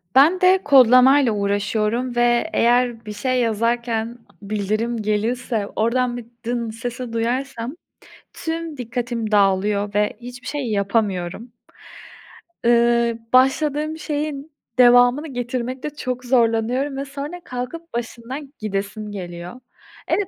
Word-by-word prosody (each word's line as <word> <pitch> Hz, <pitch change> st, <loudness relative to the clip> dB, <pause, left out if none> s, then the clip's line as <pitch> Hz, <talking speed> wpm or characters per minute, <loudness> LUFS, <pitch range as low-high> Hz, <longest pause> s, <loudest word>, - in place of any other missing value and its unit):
Ben 320 Hz, +8 st, +6 dB
de 370 Hz, +1 st, +5 dB
kodlamayla 260 Hz, -1 st, +6 dB
uğraşıyorum 210 Hz, +4 st, -1 dB
ve 240 Hz, +5 st, +2 dB
eğer 240 Hz, -1 st, +2 dB
bir 210 Hz, -, -6 dB
şey 255 Hz, +4 st, 0 dB
yazarken 230 Hz, +1 st, -1 dB
a -, -, -24 dB, 0.2 s
bildirim 215 Hz, +3 st, -1 dB
gelirse 215 Hz, +1 st, -1 dB
oradan 245 Hz, +2 st, +1 dB
bir, 240 Hz, -, -8 dB, 0.2 s
"dın" 235 Hz, -1 st, -2 dB
sesi 240 Hz, +1 st, -6 dB
duyarsam 245 Hz, +2 st, -2 dB, 0.6 s
tüm 325 Hz, -1 st, -4 dB
dikkatim 240 Hz, -2 st, -3 dB
dağılıyor 205 Hz, 0 st, +2 dB
ve 210 Hz, 0 st, +1 dB
hiçbir 245 Hz, +1 st, -10 dB
şey 280 Hz, -6 st, -3 dB
yapamıyorum. 200 Hz, +1 st, -1 dB, 1.1 s
Iıı, 235 Hz, 0 st, +3 dB
başladığım 295 Hz, +4 st, +2 dB
şeyin 300 Hz, -1 st, -4 dB, 0.3 s
devamını 245 Hz, +4 st, +6 dB
getirmekte 255 Hz, +1 st, -4 dB
çok 255 Hz, -3 st, -5 dB
zorlanıyorum 245 Hz, +3 st, +1 dB
ve 275 Hz, -, -3 dB
sonra 285 Hz, +6 st, -7 dB
kalkıp 270 Hz, +7 st, -6 dB
başından 240 Hz, +4 st, -6 dB
gidesim 210 Hz, 0 st, -4 dB
geliyor. 180 Hz, +3 st, -7 dB, 0.5 s
Evet, 405 Hz, -3 st, +1 dB
240 Hz, 110 wpm, -21 LUFS, 220-265 Hz, 1.1 s, Ben